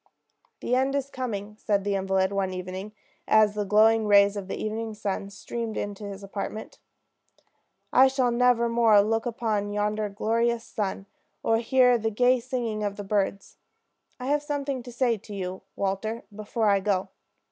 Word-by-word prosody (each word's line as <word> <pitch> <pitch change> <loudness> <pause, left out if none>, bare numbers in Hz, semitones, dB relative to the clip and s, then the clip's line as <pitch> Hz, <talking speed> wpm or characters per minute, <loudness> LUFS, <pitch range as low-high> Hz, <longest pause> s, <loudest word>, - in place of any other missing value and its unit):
"The 245 - -2
end 265 +2 +2
is 275 0 -2
coming," 210 -5 -5
said 200 -2 0
the 200 0 -1
invalid 190 0 +1
one 195 -2 -1
evening, 185 +3 -6 0.4
as 215 -1 +5
the 210 -1 -2
glowing 220 +2 +4
rays 200 0 +5
of 200 -2 -5
the - - -4
evening 220 0 -4
sun 200 -1 -3
streamed 225 +3 -5
into 205 0 -4
his 200 0 -7
apartment. 200 +2 -6 1.1
"I 260 +2 +7
shall 260 -2 +1
never 240 -1 +3
more 230 -3 +5
look 225 +3 0
upon 220 -3 -1
yonder 210 +1 -1
glorious 230 +3 0
sun, 195 -3 -4 0.4
or 225 - +3
hear 250 +1 +4
the 225 0 0
gay 245 +4 +3
singing 235 -4 -3
of 200 -1 -2
the 205 - -6
birds. 200 0 -2 0.6
I 250 - -6
have 290 +2 +1
something 285 -3 -3
to 245 0 -10
say 240 -1 +1
to 205 +1 -10
you, 185 -1 -5
Walter, 200 +4 -2
before 215 +1 -1
I 200 - +3
go. 195 -1 0
215 Hz, 170 wpm, -26 LUFS, 200-235 Hz, 1.1 s, I